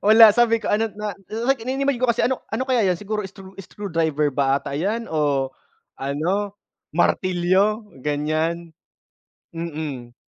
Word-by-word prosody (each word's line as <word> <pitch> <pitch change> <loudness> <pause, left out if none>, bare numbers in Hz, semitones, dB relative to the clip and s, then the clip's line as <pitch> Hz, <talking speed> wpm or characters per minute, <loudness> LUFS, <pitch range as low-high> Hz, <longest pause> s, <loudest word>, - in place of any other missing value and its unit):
Wala 220 0 +10
sabi 230 -1 +3
ko - - -1
ano, 220 +1 +1
na 210 0 -4 0.3
like 270 -2 +2
ini-imagine 270 +1 0
ko 250 - +4
kasi 235 - +1
ano 260 0 0
ano 225 +4 -1
kaya 245 -5 +3
'yan, 175 - 0
siguro 210 +1 -3
screw 190 0 -13
screwdriver 165 -6 -1
ba 135 0 +2
ata 140 - -6
'yan 215 +9 -2
o 145 -4 +1 0.5
ano, 180 +9 -1 0.4
martilyo, 185 +5 +2 0.2
ganiyan. 155 +4 -1 0.8
Mm. 150 -7 -5
185 Hz, 140 wpm, -22 LUFS, 155-220 Hz, 0.8 s, Wala